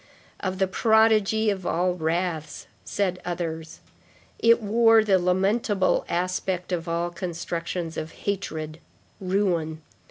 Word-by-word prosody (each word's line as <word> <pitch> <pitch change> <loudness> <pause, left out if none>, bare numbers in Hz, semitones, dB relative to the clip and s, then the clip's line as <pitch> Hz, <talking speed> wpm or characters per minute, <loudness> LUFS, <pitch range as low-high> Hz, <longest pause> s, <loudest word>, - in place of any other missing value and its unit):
Of 190 -1 -3
the 190 - +3
prodigy 220 +1 +3
of 190 -2 -4
all 180 +1 +1
wraths, 160 -2 -2 0.2
said 185 -3 -2
others. 165 -2 -5 0.6
It 230 0 +5
wore 225 +1 +4
the 195 -3 +3
lamentable 195 +2 +1
aspect 180 +1 -2
of 170 -1 -2
all 170 +1 -1
constructions 170 -1 -4
of 160 +1 -4
hatred, 160 -6 -4 0.4
ruin. 180 -5 -1
180 Hz, 115 wpm, -25 LUFS, 170-200 Hz, 0.6 s, It